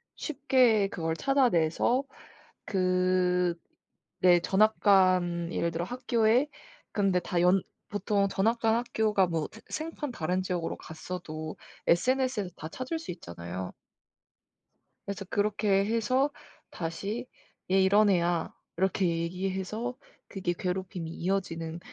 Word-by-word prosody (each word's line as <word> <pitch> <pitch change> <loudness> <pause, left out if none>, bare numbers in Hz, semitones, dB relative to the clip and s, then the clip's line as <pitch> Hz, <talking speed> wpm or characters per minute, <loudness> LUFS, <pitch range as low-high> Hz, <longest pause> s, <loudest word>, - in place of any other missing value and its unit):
쉽게 255 -8 +3
그걸 165 -3 -2
찾아내서 245 - +2 0.6
그 185 -2 +2 0.7
네 175 -1 +7
전학 215 +5 +3
간 185 -4 +3
예를 170 - 0
들어 165 +1 -2
학교에 240 +3 +2 0.4
근데 195 -3 +2
다 175 0 -1
연 180 +1 +4 0.3
보통 205 -1 +1
전학 220 +4 +1
간 225 -1 +3
학교가 220 -4 +2
뭐 165 -3 -2 0.2
생 310 +1 -3
생판 295 -4 -5
다른 180 -2 -1
지역으로 180 -3 -2
갔어도 155 -1 -7 0.3
SNS에서 255 +2 +2
다 155 - -7
찾을 255 - -4
수 325 - -10
있잖아요. 90 - -6 1.3
그래서 200 0 -5
그렇게 205 -1 +2
해서 230 +6 +2 0.4
다시 200 +8 -4 0.4
"얘 190 0 +5
이런 205 +2 +5
애야." 175 -3 +1 0.2
이렇게 190 +1 +1
얘기해서 190 +7 -2 0.3
그게 185 -3 -2
괴롭힘이 180 -2 -3
이어지는 165 -3 -2
190 Hz, 245 characters per minute, -29 LUFS, 175-220 Hz, 1.3 s, 네